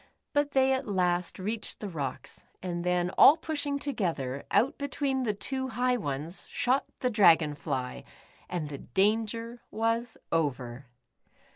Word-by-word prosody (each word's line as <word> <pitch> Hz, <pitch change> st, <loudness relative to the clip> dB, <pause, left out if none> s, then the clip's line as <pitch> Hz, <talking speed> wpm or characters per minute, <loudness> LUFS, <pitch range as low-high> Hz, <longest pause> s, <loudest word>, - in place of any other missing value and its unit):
But 290 Hz, 0 st, +1 dB
they 265 Hz, 0 st, +4 dB
at 260 Hz, -1 st, -2 dB
last 180 Hz, -3 st, 0 dB
reached 215 Hz, +4 st, -3 dB
the 210 Hz, -, -4 dB
rocks, 145 Hz, -8 st, -5 dB, 0.2 s
and 175 Hz, -2 st, -3 dB
then, 180 Hz, 0 st, +1 dB
all 300 Hz, -, +9 dB
pushing 295 Hz, -3 st, -2 dB
together, 165 Hz, -, -2 dB
out 260 Hz, -, +2 dB
between 280 Hz, -1 st, -1 dB
the 225 Hz, -4 st, 0 dB
two 260 Hz, +5 st, -3 dB
high 250 Hz, +1 st, +1 dB
ones 155 Hz, -, -3 dB
— -, -, -20 dB
shot 260 Hz, +3 st, +1 dB, 0.2 s
the 250 Hz, -, +1 dB
Dragon 165 Hz, -8 st, +5 dB
Jiy, 130 Hz, -, -4 dB, 0.5 s
and 165 Hz, -5 st, -3 dB
the 140 Hz, -2 st, -6 dB
dan 210 Hz, -, +2 dB
ger 230 Hz, +2 st, -6 dB
was 230 Hz, +1 st, -1 dB
over. 130 Hz, -5 st, -1 dB
210 Hz, 150 wpm, -29 LUFS, 160-255 Hz, 0.5 s, all